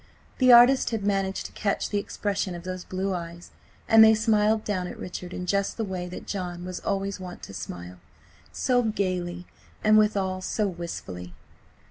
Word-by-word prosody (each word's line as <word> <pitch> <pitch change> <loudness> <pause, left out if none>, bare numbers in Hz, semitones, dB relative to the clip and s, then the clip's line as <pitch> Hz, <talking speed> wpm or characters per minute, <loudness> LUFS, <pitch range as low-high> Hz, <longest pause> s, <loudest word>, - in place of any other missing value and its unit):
The 255 -1 +6
artist 245 +2 +7
had 225 -3 -3
managed 195 -1 0
to - - -7
catch 200 -2 -2
the 205 - +1
expression 200 -2 -3
of 170 - -8
those 185 0 -5
blue 190 +1 -2
eyes, 170 0 -7 0.4
and 225 0 +8
they 220 0 +7
smiled 215 0 +2
down 185 -4 -2
at - - -8
Richard 180 0 -7
in 180 - -5
just 200 +2 0
the 225 - -1
way 185 -3 -4
that 180 - -8
John 180 -3 -4
was 185 0 -5
always 195 -1 -2
wont 180 -1 -9
to - - -9
smile–so 90 - -4
gaily, 185 -5 -2 0.4
and 215 0 +6
withal 195 -3 +1
so 210 +2 -1
wistfully. 95 - -7
190 Hz, 170 wpm, -26 LUFS, 180-210 Hz, 0.4 s, and